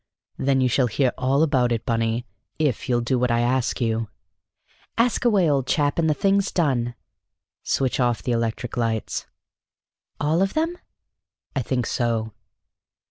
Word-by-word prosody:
"Then 135 -1 +2
you 130 - +3
shall 125 +1 +2
hear 125 +3 +1
all 135 +4 +2
about 130 -6 +2
it, 115 -2 -1
Bunny, 115 +1 0 0.3
if 145 -4 -1
you'll 120 -1 +2
do 125 +2 0
what 125 0 +1
I 120 0 +2
ask 125 +1 0
you." 115 -2 -1 0.9
"Ask 235 +1 +2
away, 200 -7 +4
old 140 -4 +1
chap, 145 0 +1
and 160 -1 +2
the 150 - +2
thing's 195 +2 +2
done." 125 -8 0 0.7
"Switch 135 -1 0
off 120 -3 +1
the 125 - -1
electric 115 +1 -2
lights." 115 -2 -2 0.9
"All 155 +4 +1
of 195 0 0
them?" 325 +2 0 0.8
"I 135 - +1
think 125 0 -1
so." 115 -2 -1
125 Hz, 155 wpm, -23 LUFS, 120-150 Hz, 0.9 s, away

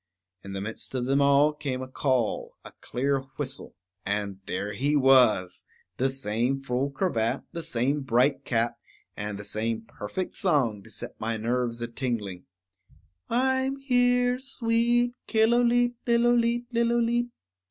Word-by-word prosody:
In 100 - -7
the 95 - -3
midst 110 +5 -7
of 125 -1 -1
them 135 +2 +2 0.4
came 130 -3 -3
a - - -7
call, 130 -3 -1
a - - -10
clear 135 +2 0 0.2
whistle, 140 -2 -2 0.3
and 100 -1 -2
there 105 +1 -3
he 140 +7 +1
was, 130 -9 +4 0.3
the 135 +2 +2
same 130 0 -1
full 135 +1 -1
cravat, 135 -6 -1
the 170 - -5
same 145 -2 0
bright 135 +2 +2
cap, 115 -1 0 0.4
and 105 -1 -4
the 100 - -7
same 110 +2 -2
perfect 115 - -5
song 135 - +1
to - - -16
set - - -6
my 115 +1 -2
nerves 120 +1 -1
a - - -2
tingling: 115 -7 -3 0.8
_I'm 260 +2 +1
here, 245 -1 +2
sweet 240 -1 +1
Killooleet 240 +2 +3
lillooleet 240 0 +2
lillooleet! 235 +1 +2
135 Hz, 135 wpm, -27 LUFS, -, 0.8 s, was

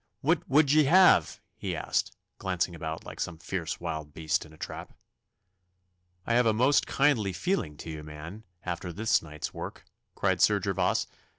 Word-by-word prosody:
What - - +1
would 140 +1 +5
ye 155 0 +5
have?' 180 +6 +5 0.2
he - - -4
asked, - - -1 0.2
glancing 90 -2 -1
about 80 -1 -5
like - - -9
some 80 - -3
fierce 85 0 -4
wild 75 -1 -5
beast 80 +1 -1
in - - -18
a 80 - -16
trap. - - -7 1.3
'I 115 - 0
have 120 +1 +4
a 110 - +4
most 130 +6 +3
kindly 125 -9 +2
feeling 165 - -1
to 80 - -8
you, 80 -1 -6
man, 75 +8 -9 0.2
after 90 0 -4
this 110 +6 +2
night's 75 -1 -6
work,' - - -7 0.3
cried - - +1
Sir 105 -1 +5
Gervas. 95 -1 0
90 Hz, 170 wpm, -28 LUFS, 80-120 Hz, 1.3 s, would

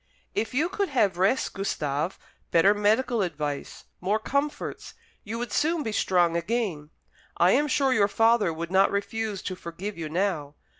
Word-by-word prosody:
"If 225 +2 -2
you 305 +5 +2
could 400 +2 -2
have 205 -10 +1
rest, 200 +8 +2
Gustave, 155 -4 -2 0.3
better 175 +4 +5
medical 220 +3 +2
advice, 150 -5 -4 0.2
more 200 +4 +1
comforts, 280 +6 -3 0.3
you 225 +2 -5
would 240 -2 -4
soon 320 +1 +1
be 220 - -3
strong 175 -4 +2
again. 170 -5 -2 0.5
I 175 +2 +5
am 290 +6 +3
sure 270 -1 +2
your 205 -4 +4
father 225 -2 +3
would 165 +2 -5
not 190 +1 +5
refuse 205 0 -3
to 185 - -4
forgive 180 +3 -7
you 155 -2 -4
now. 160 -4 -1
200 Hz, 160 wpm, -26 LUFS, 170-235 Hz, 0.5 s, better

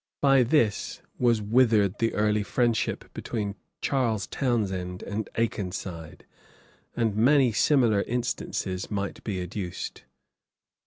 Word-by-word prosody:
By 135 -2 +5
this 115 -4 +1 0.2
was 115 -4 +3
withered 105 -3 +3
the 115 -1 +1
early 105 0 +2
friendship 120 +2 -1
between 105 -4 -3 0.3
Charles 115 -8 0
Townshend 95 -9 -2
and 105 +1 -4
Akenside; 90 -7 -3 0.7
and 115 -4 0
many 130 +3 +4
similar 115 -4 +3
instances 115 -5 -3
might 100 -1 -3
be 100 -4 -3
adduced. 90 0 -5
110 Hz, 105 wpm, -27 LUFS, 100-120 Hz, 0.7 s, By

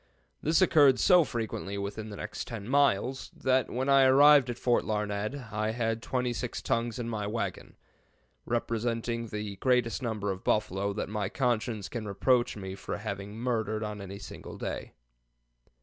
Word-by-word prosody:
This 160 +4 +3
occurred 145 -7 +6
so 180 +5 +6
frequently 110 -6 -4
within 105 +2 -5
the 105 - -7
next 105 - -6
10 110 -3 -6
miles, 135 -2 +2
that 130 -2 +2
when 130 +3 -2
I 135 -1 +6
arrived 140 0 +7
at 120 - -3
Fort 120 -1 +2
Larned 105 +2 -2 0.2
I 110 +1 -1
had 115 -1 -1
twenty 125 0 -1
six 120 0 -4
tongues 115 0 -1
in 120 -2 -3
my 105 -3 -3
wagon, 105 -4 -4 0.7
representing 115 0 -2
the 105 -2 -5
greatest 125 +2 +1
number 110 -5 -2
of 95 0 -6
buffalo 100 -1 0
that 105 - -3
my 105 -2 -2
conscience 115 -5 -1
can 115 -3 -5
reproach 120 +4 +2
me 95 -2 -6
for 95 - -5
having 100 -1 -5
murdered 110 -3 -1
on 105 -1 -5
any 100 0 -7
single 95 - -9
day. - - -5
115 Hz, 165 wpm, -29 LUFS, 105-125 Hz, 0.7 s, arrived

